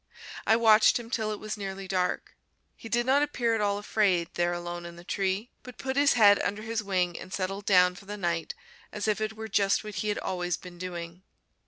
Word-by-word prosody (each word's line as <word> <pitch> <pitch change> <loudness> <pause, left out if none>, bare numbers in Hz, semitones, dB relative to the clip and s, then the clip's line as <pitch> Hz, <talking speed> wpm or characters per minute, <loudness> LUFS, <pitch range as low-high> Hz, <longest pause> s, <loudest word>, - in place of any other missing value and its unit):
I 220 - +6
watched 220 -2 +5
him 235 -1 -9
till 220 -3 -1
it 210 - -5
was 215 0 -4
nearly 195 -1 -6
dark. 185 -1 -1 0.4
He 225 - -10
did 240 +2 +1
not 270 +3 +4
appear 245 -6 0
at 225 - 0
all 200 -1 +1
afraid 200 -4 +1
there 175 0 +1
alone 175 0 -5
in 170 0 -9
the 170 - -12
tree, 195 +4 -2
but 250 -2 -12
put 265 0 -3
his 285 0 +4
head 205 -4 +6
under 205 +3 -2
his 225 0 -2
wing 185 -4 -1
and 185 - -10
settled 195 +1 -3
down 180 -2 +5
for 195 +2 -14
the 205 +1 -6
night 170 - -2 0.4
as 210 0 -4
if 215 0 +1
it 215 0 -1
were 220 0 -7
just 200 -1 +2
what 210 0 -7
he 195 +2 -3
had 205 - 0
always 180 -2 -2
been 175 -1 -12
doing. 175 -1 -6
200 Hz, 225 wpm, -28 LUFS, 180-220 Hz, 0.4 s, I